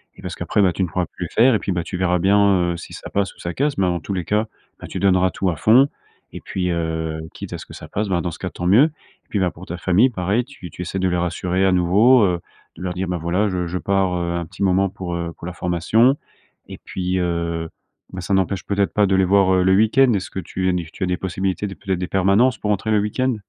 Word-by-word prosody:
et - - -14
parce - - -6
qu'après, 105 - 0
bah, 95 - +4
tu 95 - -1
ne 90 - 0
pourras 90 +2 -1
plus 90 - -6
le - - -11
faire, 120 +3 +5
et - - +1
puis, 95 - -2
bah, 85 - -1
tu 90 +2 -5
verras 90 -1 +1
bien, 95 -1 +3
heu, - - -6
si 85 - -10
ça - - -8
passe 100 -1 -1
ou - - -23
ça 85 0 -4
casse, 145 +1 0
mais 95 - +2
en 85 -1 0
tous 100 - -5
les 90 -2 -2
cas, 105 +1 +1 0.3
bah, - - -8
tu - - -5
donneras 95 -1 +3
tout 95 - -1
à 80 - -1
fond, 125 - +5 0.5
et - - -6
puis, 90 -1 -3
heu, 80 -1 -2
quitte - - -8
à - - -3
ce - - -10
que - - -13
ça - - -10
passe, 105 +1 -2
bah 85 -2 +1
dans 85 0 -3
ce - - -10
cas, - - -3
tant 90 - -6
mieux, 115 +10 +6
et 155 -1 -11
puis 105 - -1
bah, 90 -2 +1
pour 90 - -12
ta 90 - -6
famille, 95 +8 +3
pareil, 105 +3 -1
tu 125 -10 -11
tu - - -8
essaies 90 +2 -3
de 95 0 +1
les 90 - 0
rassurer 90 +2 0
à 95 - +4
nouveau, 105 +8 +5
heu, 90 -3 +1 0.4
de 90 - -10
leur 90 -1 -2
dire: 95 +1 -3
«bah, 90 - -1
voilà 90 +5 0
je 90 -2 -2
je 90 - -3
pars, 95 -1 0
heu, 85 0 -2
un 85 - -2
petit 90 +4 -6
moment 95 +1 +3
pour, 90 -3 -5
heu, 85 -1 -4
pour 85 - -8
la 90 - -5
formation» 90 +10 +2 0.5
et - - -9
puis, 90 0 -3
heu, 85 -2 -2 0.4
ben, 90 - -5
ça 90 +3 -2
n'empêche 95 0 0
peut 100 0 -2
être 100 - +1
pas 105 -1 +3
de 95 - +2
les 95 0 +3
voir, 95 0 +4
heu, 90 - +3
le 95 +1 +4
week-end. 120 +5 +4
Est 100 - +1
ce - - -8
que - - -4
tu 95 +1 -2 0.2
tu - - -5
as - - 0
des 90 -1 0
possibilités, 95 +1 -2
de 95 - -6
peut 95 - -7
être, 90 - +1
des 90 - -3
permanences 100 +6 +3
pour 105 - -1
entrer 105 +2 -1
le 105 - +4
week-end? 125 +4 0
95 Hz, 290 wpm, -21 LUFS, 90-100 Hz, 0.5 s, mieux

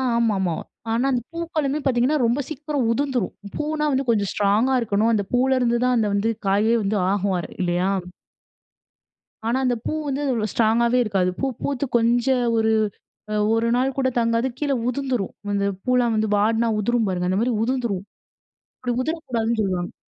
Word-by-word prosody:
ஆமாமா. 200 -7 +1 0.4
ஆனா, 235 +3 +1
அந்த 250 -2 0
பூக்களுமே 310 -4 -1
பார்த்தீங்கன்னா, 260 +3 +2
ரொம்ப 235 +4 +1
சீக்கிரம் 295 -4 -2
உதிர்ந்துரும். 260 -4 -1 0.2
பூன்னா 300 0 -1
வந்து 265 0 0
கொஞ்சம் 205 -4 +2
ஸ்ட்ராங்கா 210 +6 +2
இருக்கணும். 220 0 +1
அந்த 205 -2 +1
பூவுல 260 +2 +3
இருந்து 240 -1 +1
தான், 250 0 +3
அந்த 220 -2 +2
வந்து 200 +3 +1 0.2
காயே 205 +4 +3
வந்து 205 +2 0
ஆகுவாரு 195 -3 -1
இல்லையா? 180 +1 +1 1.6
ஆனா 235 +3 +1
அந்த 250 -1 +2
பூ - - -1 0.2
வந்து 275 0 -2
அவ்வள 225 -3 0
ஸ்ட்ராங்காவே 235 +2 +2
இருக்காது. 195 -4 +1
பூ - - 0 0.2
பூத்து 280 -1 -1
கொஞ்ச 235 +1 +2 0.3
ஒரு, 220 0 +2 0.6
அ - - -1 0.2
1 225 +1 +1
நாள் 260 +1 0
கூட 260 -1 +2
தாங்காது 230 +2 +1
கீழ 290 -2 0 0.2
உதுந்துரும். 250 -6 -2 0.2
அந்த 200 0 +1 0.2
பூல்லாம் 250 -2 +2
வந்து 215 0 +1
வாடுனா 225 +3 +2
உதுரும் 235 0 +1
பாருங்க 180 -1 -1
அந்த 190 +2 +1
மாரி 245 +1 +1
உதுந்துரும். 235 -6 -1 0.8
அப்டி 245 -1 -1
உதுரக்கூடாதுன்னு 240 -8 -1
சொல்வாங்க. 185 -3 -2
235 Hz, 160 wpm, -23 LUFS, 210-260 Hz, 1.6 s, பூவுல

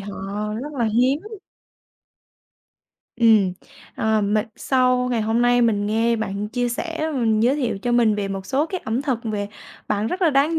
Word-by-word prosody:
họ 195 0 -7 0.5
rất 300 +1 -6
là 245 -5 -1
hiếm. 245 +6 +2 2.0
Ừm, 220 -5 +4 0.4
ờ, 220 -1 +1
mình 210 +2 +1
sau 250 -1 +2
ngày 235 - +1
hôm 225 +2 +1
nay 245 0 +4
mình 205 -3 +1
nghe 230 +2 +1
bạn 210 -1 -3
chia 245 +1 -1
sẻ, 330 +8 -4
ừm, 235 -8 +1
giới 250 +5 +3
thiệu 245 -8 -1
cho 240 +5 -2
mình 235 -3 +4
về 205 -1 -2
một 195 -1 -5
số 280 +3 +1
cái 370 +2 -4
ẩm 225 +4 -1
thực 265 -5 -1
về 205 -2 -3 0.4
bạn 205 +1 0
rất 365 +10 -3
là 330 - +4
đáng 295 +4 +2
235 Hz, 180 wpm, -22 LUFS, 215-260 Hz, 2.0 s, Ừm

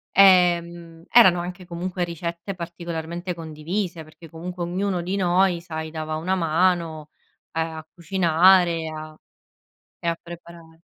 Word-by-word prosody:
Ehm, 175 -3 +4
erano 190 -7 +7
anche 180 +1 -6
comunque 175 +1 -3
ricette 170 +2 -5
particolarmente 170 0 -5
condivise 165 +2 -4
perché 155 +1 -15
comunque 175 +2 -7
ognuno 180 +1 -1
di 185 +3 -3
noi 180 -1 +2
sai, 160 -2 -6
dava 155 0 -4
una 185 +4 -1
mano, 165 -2 0 0.4
ehm, 165 0 -1
a 160 0 -9
cucinare, 170 -1 +3
a 155 0 -8 0.8
e 170 - -5
a 165 0 0
preparare. 170 -1 -13
170 Hz, 125 wpm, -23 LUFS, 165-180 Hz, 0.8 s, erano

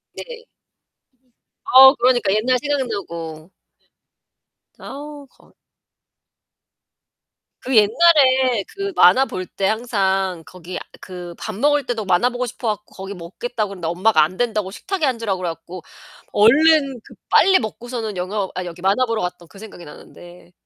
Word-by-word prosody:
네. 480 -1 -9 1.2
어 265 +1 +8
그러니까. 240 -5 +2
옛날 240 +5 +1
생각나고. 195 - -4 1.3
아우 290 0 -10
거 - - -26 2.1
그 260 - -2
옛날에 260 -1 +4
그 395 0 -5
만화 190 +10 +5
볼 185 -7 -6
때 190 +1 -3
항상 195 -6 -1
거기 180 0 -9 0.2
그 180 -2 -9
밥 215 - -6
먹을 290 +5 +1
때도 235 -4 -3
만화 185 +6 +2
보고 250 0 -3
싶어 240 -1 -4
갖고 210 - -26
거기 195 +1 -7
먹겠다 210 +6 -5
그랬는데 185 -4 -7
엄마가 175 0 +3
안 175 +5 -4
된다고 215 -5 -1
식탁에 360 - -3
앉으라 230 -7 -1
그래 180 -1 -3
갖고 170 +2 -9 0.5
얼른 275 +4 +4
그 - - -16 0.2
빨리 380 -1 +5
먹고서는 225 -2 -6
영화 190 +2 -3
아니 180 0 -4
여기 175 0 -10
만화 200 +7 +2
보러 230 -2 -2
갔던 180 -1 -6
그 195 - -16
생각이 205 -5 -11
나는데. 175 +4 -15
215 Hz, 280 characters per minute, -20 LUFS, 185-255 Hz, 2.1 s, 어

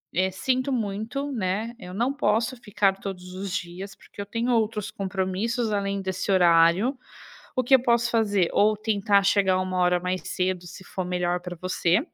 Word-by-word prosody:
eh, 185 +2 +2
sinto 255 +8 0
muito, 225 +6 -2
né, 215 +1 -2
eu 180 -3 -9
não 240 +7 0
posso 235 -2 +1
ficar 200 -3 0
todos 180 -2 -7
os 195 +1 -5
dias, 185 +2 -6
porque 200 - -11
eu - - -5
tenho 230 +4 -1
outros 220 -2 0
compromissos 200 +4 -2
além 200 -1 -1
desse 190 +1 -2
horário, 175 +7 +4 0.6
o 255 - +1
que 265 +2 +6
eu 255 - +3
posso 235 -1 +2
fazer, 205 -6 +2
ou 215 +1 +4
tentar 205 -2 +2
chegar 190 -2 +3
1 185 0 -2
hora 180 0 +3
mais 180 +1 -2
cedo, 180 -1 -1
se 185 +2 -11
for 185 - -4
melhor 180 0 -1
pra 180 0 -6
você", 185 +1 +1
195 Hz, 180 wpm, -25 LUFS, 185-225 Hz, 0.6 s, que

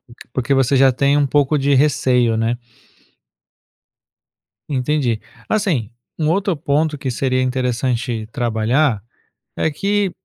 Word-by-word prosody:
porq 120 -2 -19 0.2
porque 130 +1 -1
você 135 0 +2
já 135 0 +5
tem 140 +3 +2
pouco 145 +2 +2
de 140 0 +2
receio, 130 -5 +2
né? 115 +2 0 2.1
Entendi. 130 -4 0 0.3
Assim, 180 - 0 0.3
um 155 0 +1
outro 195 -1 0
ponto 150 +2 0
que 135 -2 -4
seria 130 +1 0
interessante 125 -2 -1
trabalhar 120 0 +1 0.5
é 160 - 0
que 200 +4 0
135 Hz, 115 wpm, -19 LUFS, 120-150 Hz, 2.1 s, já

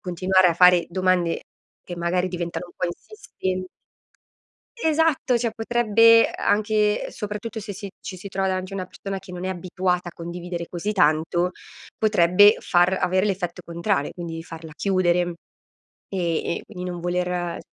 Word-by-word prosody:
continuare 185 +1 +3
a 170 - +1
fare 180 0 +6
domande 185 -2 +1 0.4
che 175 - -6
magari 175 +1 0
diventano 175 -1 -4
un 175 - -17
po' - - -2
insisten 185 - -5 1.1
Esatto! 315 - +2
Cioè 230 -1 -1
potrebbe 230 0 +4
anche, 210 0 +1
soprattutto, 210 +2 -5
se 205 0 -6
si 200 +1 -7
ci 185 - -8
si 200 - -8
trova 195 0 -1
davanti 185 +1 -3
una 185 - -3
persona 195 +1 -6
che 190 -1 -12
non 180 0 -6
è - - -1
abituata 180 -1 -2
a - - -25
condividere 170 0 -6
così 185 +4 -3
tanto, 170 +1 +2 0.4
potrebbe 205 0 +5
far 175 0 +3
avere 185 +2 +2
l'effetto 180 -3 -2
contrario, 170 -2 -1
quindi 165 -2 -6
farla 165 -1 -10
chiudere, 185 -2 +2 0.9
e 170 -3 -1
e - - -11
quindi 180 -3 -7
non 175 -1 -6
voler 175 0 -2
185 Hz, 150 wpm, -23 LUFS, 175-205 Hz, 1.1 s, fare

